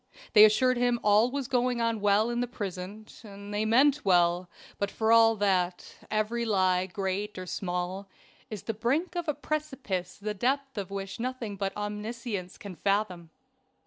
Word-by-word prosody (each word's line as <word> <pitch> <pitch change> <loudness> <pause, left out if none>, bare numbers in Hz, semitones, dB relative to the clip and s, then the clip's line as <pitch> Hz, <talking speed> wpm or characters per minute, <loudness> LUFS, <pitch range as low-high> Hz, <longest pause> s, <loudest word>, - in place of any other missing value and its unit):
They 210 -1 +10
assured 255 +4 +3
him 245 -1 +2
all 210 +3 +4
was 275 -1 -3
going 250 -1 +1
on 230 -2 0
well 205 +3 +3
in 240 - -1
the 245 - -1
prison. 200 -1 -6 0.2
They 205 0 -4
meant 275 +6 +4
well; 175 -1 +3 0.3
but 200 - 0
for 220 +2 0
all 225 0 +6
that, 185 -3 0
every 215 +2 0
lie, 185 -4 +2
great 195 +2 -3
or 185 - -5
small, 180 +2 -4 0.4
is 215 -4 -7
the 225 - -3
brink 280 - -1
of 345 -1 -3
a 300 - 0
precipice 270 -12 -4
the 210 +1 -4
depth 270 +6 -1
of 200 -4 -4
which 195 +2 -6
nothing 245 -4 -4
but 195 0 -3
Omniscience 210 -2 -5
can 200 -6 -9
fathom. 195 -4 -1
210 Hz, 165 wpm, -28 LUFS, 195-240 Hz, 0.4 s, They